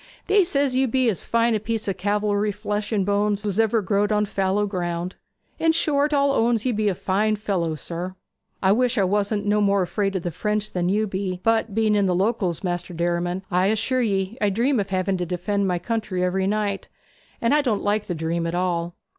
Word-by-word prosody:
They 405 -1 +4
says 280 -5 +1
you 265 +1 +3
be 255 0 +2
as 190 - -6
fine 230 0 +2
a 215 - +1
piece 220 +1 -3
of 195 - -1
calvery 205 +1 0
flesh 210 +1 -3
and 200 -4 +1
bones 205 0 +1
as - - -9
was 205 0 -1
ever 225 -1 +2
growed 205 +2 +1
on 210 0 +2
fallow 195 +1 0
ground; 175 -2 -3 0.4
in 325 0 +3
short, 295 -2 +1
all 280 -1 +3
owns 235 -4 +2
that 255 - 0
you - - 0
be 210 -1 +1
a 190 - -1
fine 210 +4 +1
fellow, 185 -6 -1
sir. 175 +4 -5 0.5
I 190 - +5
wish 245 +3 +2
I 200 - +4
wasn't 205 +2 0
no 210 +1 +2
more 200 -1 +3
afraid 195 +2 -1
of 185 - -2
the 175 - -2
French 210 +5 -2
than 180 -1 -1
you 210 +3 +2
be; 190 -2 -3
but 225 -2 +1
being 220 -1 +2
in 200 -2 +2
the 180 - +1
Locals, 190 -3 0
Maister 175 -1 -3
Derriman, 175 +2 -1
I 180 +1 +3
assure 225 +5 +1
ye 200 +1 -1
I 205 - +3
dream 240 +6 +1
of 200 -1 -2
having 190 0 0
to 180 - -2
defend 190 +3 -1
my 180 -1 +1
country 210 -1 -2
every 190 +1 0
night; 205 -1 -1 0.5
and 230 +3 +2
I 300 - +4
don't 230 -7 -1
like 210 +1 0
the 175 - -2
dream 165 +1 -2
at 165 - -3
all.' 175 -1 -1
205 Hz, 225 wpm, -23 LUFS, 185-220 Hz, 0.5 s, I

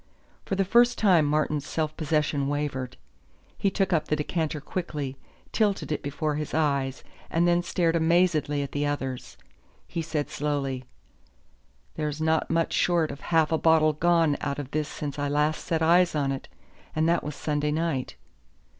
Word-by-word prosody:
For 195 - -1
the 195 0 +1
first 240 +4 +4
time 180 -7 +4
Martin's 150 -1 0
self 155 -1 -2
possession 150 -3 0
wavered. 140 -3 -3 0.6
He 200 - +1
took 195 -1 0
up 160 - +1
the 150 - +1
decanter 150 0 -2
quickly, 145 -4 -4 0.4
tilted 205 -7 0
it 150 - -1
before 150 +1 -2
his 150 0 -4
eyes, 140 -4 0 0.3
and 170 +1 +2
then 175 0 +3
stared 170 -2 0
amazedly 160 -3 +2
at 140 - -6
the 145 - -1
others. 135 - -3 0.5
He 165 - -3
said 155 -2 -3
slowly: 135 -3 -2 1.1
"There's 150 -1 -2
not 160 0 +1
much 165 0 +1
short 170 -3 +2
of 140 - -9
half 165 -2 +2
a 160 - +2
bottle 160 -1 +4
gone 165 -1 +2
out 140 -1 -2
of 145 -2 -6
this 155 -1 -1
since 145 -1 -5
I 145 - 0
last 150 +2 +1
set 160 -1 0
eyes 170 +1 +4
on 140 -2 +1
it 135 - -5 0.5
and 155 +1 +2
that 170 0 +2
was 150 -1 -5
Sunday 150 -1 -1
night." 155 -4 -1
155 Hz, 170 wpm, -26 LUFS, 145-165 Hz, 1.1 s, first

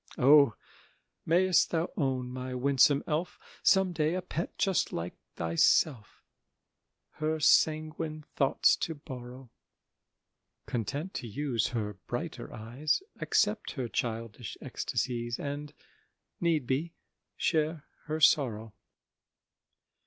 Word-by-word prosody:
O, 140 -2 +6 0.7
mayst 180 +2 +4
thou 165 +1 -1
own, 130 -4 -1
my 130 0 -5
winsome 140 +2 +4
elf, 165 +3 -2 0.2
Some 190 -2 +4
day 160 +1 +1
a 185 - -3
pet 170 -1 -4
just 195 -2 +1
like 85 +1 -4 0.2
thyself, 105 - +2 0.9
Her 155 +1 -1
sanguine 155 0 +2
thoughts 135 -2 +4
to 165 - -3
borrow; 125 -3 -10 1.1
Content 140 - -3
to 120 - -5
use 120 0 -1
her 105 -4 -3
brighter - - -5
eyes, 130 - -1 0.2
Accept 210 0 +1
her 130 -5 -3
childish 115 -1 -4
ecstacies, 120 -1 -3
And, 145 +1 -5 0.7
need 165 -6 +1
be, 150 +7 -2 0.4
share 155 -1 0 0.2
her 155 0 -2
sorrow! 115 -8 +3
145 Hz, 105 wpm, -30 LUFS, 120-160 Hz, 1.1 s, O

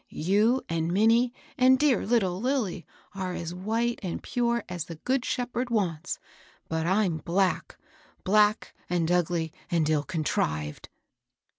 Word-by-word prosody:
You 210 +10 +2
and 165 0 -1
Minnie 225 +5 +4 0.3
and 260 +1 +6
dear 280 -6 +2
little 195 -6 +1
Lilly 235 - -1 0.3
are 185 -2 -3
as 170 0 -5
white 225 +6 -1
and 180 -3 -4
pure 235 -1 0
as 175 -2 -4
the 165 - -8
Good 255 - -1
Shepherd 245 0 -2
wants; 185 -7 -1 0.5
but 160 0 -1
I'm 190 -3 +2
black, 180 +4 0 0.2
— - - -31
black 210 +2 +3 0.2
and 170 -1 +1
ugly 170 -2 0 0.2
and 165 -4 +1
ill 155 -2 +2
contrived." 75 - -2
190 Hz, 140 wpm, -27 LUFS, 170-235 Hz, 0.5 s, and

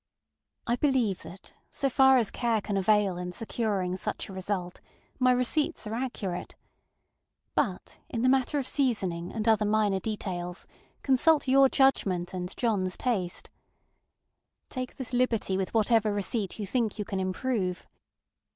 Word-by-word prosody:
I 240 +1 +1
believe 245 -9 +1
that, 170 +4 -12 0.2
so 275 - -1
far 265 0 +5
as 230 -5 +1
care 235 -3 +1
can 205 0 -3
avail 195 -1 +2
in 180 0 -5
securing 205 -5 -2
such 185 - -4
a - - -8
result, 185 -1 -4 0.4
my 255 -1 +5
receipts 250 +5 0
are 215 - -4
accurate. 215 -7 -4 1.0
But - - -2
in 235 -6 -2
the - - +4
matter 265 +2 +2
of 275 - -1
seasoning 190 -12 -1
and 220 0 -3
other 220 -1 +4
minor 210 -2 +2
details, 180 -4 -4 0.4
consult 290 +3 +3
your 270 +1 +6
judgment 190 -11 +2
and 180 -1 -4
JohnŌĆÖs 195 -6 0
taste. 195 -9 -2 1.2
Take 255 -1 -5
this 255 -2 -5
liberty 235 -6 +1
with 190 -1 -2
whatever 225 -1 +3
receipt 205 0 -1
you 210 - -3
think 225 +1 -1
you 210 - -3
can 195 -3 -3
improve. 185 -1 -2
215 Hz, 145 wpm, -28 LUFS, 190-250 Hz, 1.2 s, your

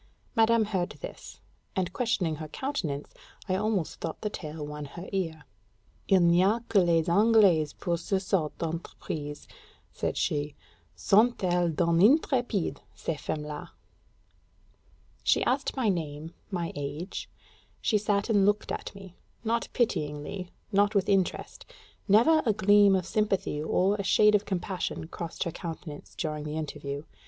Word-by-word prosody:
Madame 225 -1 +4
heard 190 -4 -1
this; - - -9 0.4
and 185 -1 -1
questioning 185 -10 0
her 155 0 -6
countenance, 155 - -4 0.3
I 185 - 0
almost 200 -4 -1
thought 165 - -4
the 210 - -2
tale 155 -4 -6
won 150 0 -6
her 170 +6 -9
ear. 165 -6 -2 0.6
"Il 190 -2 +5
n'y 170 +1 +5
a 215 +5 +2
que 200 - +4
les 165 -2 +2
Anglaises 190 -5 +4
pour 170 -1 -2
ces 190 +2 -1
sortes 165 -6 0
d'entreprises," 155 -3 -5 0.5
said - - -2
she: 145 0 -1 0.4
"sont 215 - +3
elles 175 -2 +1
done 170 0 +2
intrépides, 245 - +3 0.2
ces 155 -3 -4
femmes 150 - -3
là!" 150 -1 -6 1.5
She - - +3
asked 270 +2 0
my 255 -4 +1
name, 160 -4 -2 0.2
my 175 -4 -2
age; 145 +6 -5 0.5
she 215 - +2
sat 205 -1 0
and 205 -4 +3
looked 205 +1 +1
at - - -5
me 195 -2 -11 0.3
not 230 +1 0
pityingly, 175 -4 -2 0.2
not 205 +1 +3
with 195 -1 +2
interest: 195 -2 0 0.4
never 240 +11 +5
a 220 - +4
gleam 205 -1 +5
of 185 -2 0
sympathy 195 -6 0
or 190 +6 +2
a 200 - -2
shade 210 +2 +5
of 210 0 +3
compassion 185 -3 -3
crossed 170 -2 -4
her 170 - -3
countenance 160 -3 -8
during 155 -3 -3
the 150 +1 -4
interview. 145 -2 -5
185 Hz, 145 wpm, -28 LUFS, 155-205 Hz, 1.5 s, Il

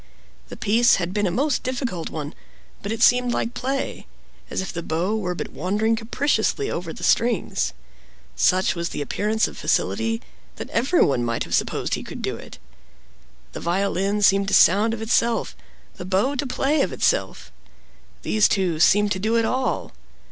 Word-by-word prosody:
The - - -8
piece 230 +4 +4
had 180 -1 -3
been 205 -1 +1
a - - -1
most 270 - 0
difficult 245 - -3
one; 150 -1 -6 0.5
but 200 - -4
it 225 +1 0
seemed 245 0 +4
like 235 - -2
play—as 270 +2 -5
if 190 - -4
the 170 - -4
bow 170 +6 -1
were 180 -5 -2
but - - -6
wandering 210 +7 0
capriciously 280 - 0
over 170 -1 -4
the - - -9
strings. 230 -4 +1 0.6
Such 185 +4 +2
was 170 -1 -3
the 145 - -4
appearance 215 +9 0
of - - -10
facility, 225 0 0 0.4
that - - -8
everyone 230 - +2
might 115 -1 -1
have - - -7
supposed - - 0
he - - -1
could - - -8
do - - -2
it. - - -11 0.9
The - - -7
violin 195 +3 0
seemed 195 0 +4
to 200 - +2
sound 210 +5 +5
of 220 - -6
itself, 230 0 +1 0.4
the - - -6
bow 195 +9 +1
to 280 0 -2
play 275 +3 +1
of 185 - 0
itself. 60 - -1 0.7
These 105 0 +3
two 180 -5 0
seemed 205 +4 +4
to 190 - 0
do 220 +4 0
it 230 -1 +2
all. 260 +3 -1
210 Hz, 170 wpm, -23 LUFS, 180-235 Hz, 0.9 s, sound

